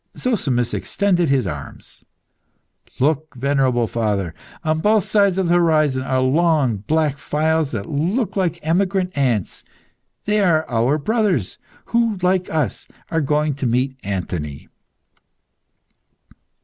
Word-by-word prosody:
Zozimus 135 Hz, -, 0 dB
extended 180 Hz, -5 st, 0 dB
his 135 Hz, -4 st, +2 dB
arms. 75 Hz, -6 st, -8 dB, 0.9 s
"Look, 155 Hz, +2 st, 0 dB
venerable 130 Hz, -2 st, +1 dB
father! 105 Hz, -7 st, -1 dB, 0.3 s
On 155 Hz, -1 st, 0 dB
both 210 Hz, +2 st, +3 dB
sides 200 Hz, -3 st, +2 dB
of 190 Hz, -2 st, +1 dB
the 170 Hz, -, +3 dB
horizon 155 Hz, -6 st, +3 dB
are 130 Hz, 0 st, 0 dB
long, 145 Hz, -4 st, +2 dB
black 145 Hz, +6 st, 0 dB
files 155 Hz, +1 st, 0 dB
that 105 Hz, -5 st, -5 dB
look 185 Hz, -, -1 dB
like 175 Hz, -4 st, 0 dB
emigrant 185 Hz, +3 st, 0 dB
ants. 125 Hz, -9 st, -1 dB, 0.6 s
They 210 Hz, +1 st, +1 dB
are 165 Hz, -5 st, +2 dB
our 120 Hz, +5 st, +1 dB
brothers, 195 Hz, -, 0 dB, 0.3 s
who, 230 Hz, -3 st, +2 dB
like 185 Hz, 0 st, +1 dB
us, 150 Hz, -, -2 dB, 0.2 s
are 160 Hz, -1 st, +1 dB
going 150 Hz, +1 st, +1 dB
to 135 Hz, -1 st, -2 dB
meet 130 Hz, +3 st, 0 dB
Anthony." 85 Hz, -7 st, -4 dB
150 Hz, 125 wpm, -20 LUFS, 125-180 Hz, 0.9 s, both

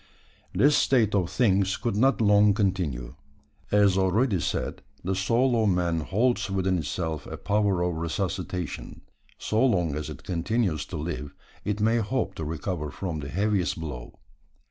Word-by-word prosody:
This 145 Hz, +2 st, +4 dB
state 115 Hz, -6 st, +3 dB
of 90 Hz, -5 st, +1 dB
things 100 Hz, -5 st, +2 dB
could 120 Hz, -4 st, -2 dB
not 130 Hz, +3 st, +3 dB
long 105 Hz, -1 st, +5 dB
continue. 85 Hz, -, -1 dB, 0.6 s
As 100 Hz, -2 st, +4 dB
already 95 Hz, +2 st, +2 dB
said, -, -, -2 dB, 0.2 s
the 95 Hz, -, -1 dB
soul 115 Hz, +5 st, +2 dB
of 110 Hz, -, +3 dB
man 90 Hz, -3 st, +1 dB
holds 105 Hz, +5 st, 0 dB
within 95 Hz, -2 st, +1 dB
itself 80 Hz, 0 st, -3 dB
a -, -, -6 dB
power 100 Hz, -3 st, +1 dB
of 90 Hz, 0 st, 0 dB
resuscitation. 90 Hz, 0 st, -4 dB, 0.4 s
So 110 Hz, +3 st, 0 dB
long 90 Hz, -, +2 dB
as 75 Hz, 0 st, -4 dB
it -, -, -9 dB
continues 90 Hz, -, -1 dB
to 90 Hz, -, -5 dB
live, 75 Hz, -2 st, -5 dB, 0.3 s
it 105 Hz, 0 st, -2 dB
may 110 Hz, +2 st, +3 dB
hope 115 Hz, +3 st, -1 dB
to 80 Hz, -, -6 dB
recover 80 Hz, 0 st, -3 dB
from 85 Hz, -1 st, -4 dB
the 70 Hz, -1 st, -6 dB
heaviest 95 Hz, 0 st, 0 dB
blow. 65 Hz, -7 st, -7 dB
95 Hz, 155 wpm, -26 LUFS, 85-105 Hz, 0.6 s, long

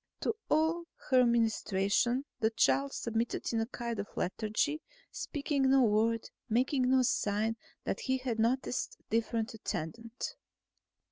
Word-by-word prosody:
To -, -, 0 dB
all 320 Hz, +2 st, +2 dB, 0.3 s
her 255 Hz, -1 st, +6 dB
ministrations 230 Hz, +2 st, +2 dB
the 220 Hz, -, +3 dB
child 135 Hz, -10 st, +2 dB
submitted 230 Hz, +1 st, -2 dB
in 225 Hz, -, +2 dB
a 225 Hz, -, -1 dB
kind 235 Hz, -3 st, -4 dB
of 200 Hz, -, -3 dB
lethargy, 220 Hz, -, 0 dB, 0.3 s
speaking 280 Hz, -3 st, 0 dB
no 270 Hz, -1 st, +6 dB
word, 225 Hz, +1 st, +2 dB, 0.2 s
making 255 Hz, +3 st, +2 dB
no 260 Hz, 0 st, +5 dB
sign 220 Hz, -3 st, +1 dB, 0.3 s
that -, -, -2 dB
he 260 Hz, -1 st, 0 dB
had 250 Hz, -3 st, -3 dB
noticed 250 Hz, +3 st, 0 dB
a -, -, -33 dB
different 230 Hz, +1 st, 0 dB
attendant. 225 Hz, +4 st, -5 dB
230 Hz, 135 wpm, -32 LUFS, 220-260 Hz, 0.3 s, her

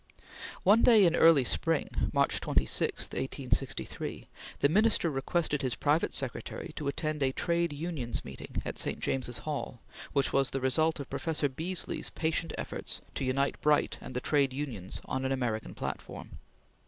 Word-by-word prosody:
One 210 Hz, +5 st, +6 dB
day 220 Hz, -5 st, +7 dB
in 170 Hz, -1 st, +4 dB
early 165 Hz, -6 st, +6 dB
spring, 165 Hz, +4 st, 0 dB
March -, -, +2 dB
26, -, -, +1 dB
1863, -, -, -2 dB, 0.3 s
the -, -, +4 dB
Minister 200 Hz, 0 st, +3 dB
requested 150 Hz, +2 st, 0 dB
his 130 Hz, -3 st, -1 dB
private 150 Hz, +3 st, +1 dB
secretary 135 Hz, +4 st, -4 dB
to 150 Hz, -, -4 dB
attend 155 Hz, +1 st, -2 dB
a 135 Hz, -1 st, +3 dB
Trades 170 Hz, +1 st, 0 dB
Union 150 Hz, -6 st, -4 dB
Meeting 65 Hz, 0 st, -6 dB
at -, -, -3 dB
St. -, -, 0 dB
James's 125 Hz, -2 st, -1 dB
Hall, 145 Hz, -5 st, -4 dB, 0.3 s
which 140 Hz, -1 st, +1 dB
was 135 Hz, -1 st, +3 dB
the 135 Hz, -, -2 dB
result 155 Hz, +5 st, +2 dB
of 140 Hz, -, -5 dB
Professor 160 Hz, -3 st, 0 dB
Beesly's 165 Hz, +7 st, -2 dB
patient 165 Hz, +1 st, -1 dB
efforts -, -, -4 dB
to -, -, -3 dB
unite 135 Hz, +2 st, 0 dB
Bright 150 Hz, 0 st, +2 dB
and 130 Hz, -, -8 dB
the 125 Hz, -, -1 dB
Trades 140 Hz, -2 st, +2 dB
Unions 120 Hz, -11 st, -5 dB
on 130 Hz, 0 st, -2 dB
an 130 Hz, -, 0 dB
American 120 Hz, -5 st, -2 dB
platform. -, -, -6 dB
145 Hz, 155 wpm, -30 LUFS, 130-165 Hz, 0.3 s, day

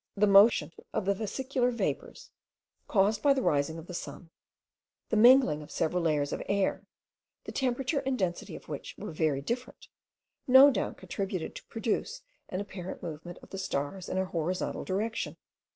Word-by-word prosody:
The 210 Hz, +1 st, +4 dB
motion 200 Hz, -5 st, +6 dB, 0.2 s
of 195 Hz, -, -1 dB
the 200 Hz, -, +3 dB
vesicular 250 Hz, +5 st, -1 dB
vapours, 240 Hz, -, -4 dB, 0.6 s
caused 205 Hz, +1 st, +2 dB
by 280 Hz, -1 st, +4 dB
the 265 Hz, -, 0 dB
rising 145 Hz, +2 st, +1 dB
of 165 Hz, -, -9 dB
the 180 Hz, -, -9 dB
sun; 170 Hz, -1 st, -7 dB, 0.8 s
the -, -, 0 dB
mingling 235 Hz, -, +6 dB
of 150 Hz, -, -11 dB
several 175 Hz, +3 st, 0 dB
layers 150 Hz, -3 st, +1 dB
of -, -, -3 dB
air, 200 Hz, -1 st, 0 dB, 0.6 s
the -, -, -7 dB
temperature 265 Hz, +2 st, 0 dB
and 270 Hz, -1 st, -1 dB
density 180 Hz, -4 st, -2 dB
of -, -, -12 dB
which -, -, -6 dB
were -, -, -6 dB
very 155 Hz, -3 st, 0 dB
different, 245 Hz, -, -5 dB, 0.6 s
no 265 Hz, +2 st, +9 dB
doubt 205 Hz, -, -2 dB
contributed 185 Hz, -2 st, -4 dB
to -, -, -10 dB
produce 245 Hz, -, -2 dB, 0.3 s
an 185 Hz, -, -3 dB
apparent 190 Hz, -2 st, -7 dB
movement 170 Hz, +2 st, -7 dB
of -, -, -15 dB
the 195 Hz, -, -5 dB
stars 175 Hz, +1 st, -3 dB
in -, -, -3 dB
the 190 Hz, 0 st, +1 dB
horizontal 180 Hz, +1 st, -2 dB
direction. 215 Hz, +4 st, -2 dB
195 Hz, 170 wpm, -29 LUFS, 170-240 Hz, 0.8 s, no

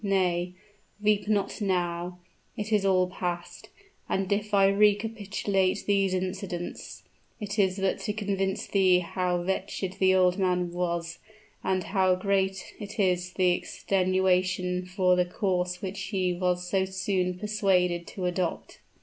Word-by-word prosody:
Nay 180 Hz, -3 st, +1 dB, 0.5 s
weep 210 Hz, -1 st, +1 dB
not 210 Hz, 0 st, 0 dB
now; 180 Hz, -2 st, -1 dB, 0.4 s
it 215 Hz, 0 st, -3 dB
is 210 Hz, -2 st, +3 dB
all 185 Hz, -2 st, +3 dB
past; 175 Hz, -1 st, -5 dB, 0.4 s
and 190 Hz, +1 st, -1 dB
if 210 Hz, +1 st, -2 dB
I 200 Hz, -1 st, +5 dB
recapitulate 205 Hz, -1 st, +1 dB
these 195 Hz, -2 st, +2 dB
incidents, 185 Hz, -1 st, -5 dB, 0.4 s
it 210 Hz, 0 st, -4 dB
is 190 Hz, -1 st, +2 dB
but 195 Hz, -1 st, 0 dB
to 210 Hz, -, -3 dB
convince 195 Hz, -2 st, -1 dB
thee 185 Hz, -2 st, +4 dB
how 180 Hz, 0 st, -1 dB
wretched 190 Hz, 0 st, -3 dB
the 190 Hz, 0 st, +4 dB
old 185 Hz, +1 st, +3 dB
man 180 Hz, -2 st, +1 dB
was, 170 Hz, -1 st, -2 dB, 0.4 s
and 185 Hz, -1 st, 0 dB
how 190 Hz, -2 st, +2 dB
great 190 Hz, 0 st, -1 dB
is 185 Hz, -4 st, -1 dB
the 185 Hz, -2 st, +3 dB
extenuation 185 Hz, 0 st, 0 dB
for 180 Hz, -1 st, +2 dB
the 180 Hz, -, +3 dB
course 180 Hz, 0 st, -2 dB
which 195 Hz, +1 st, -4 dB
he 185 Hz, -3 st, -1 dB
was 180 Hz, 0 st, -1 dB
so 190 Hz, +1 st, +1 dB
soon 190 Hz, -1 st, -1 dB
persuaded 185 Hz, -4 st, +1 dB
to 185 Hz, -, -5 dB
adopt." 180 Hz, -1 st, -2 dB
185 Hz, 135 wpm, -27 LUFS, 180-195 Hz, 0.5 s, I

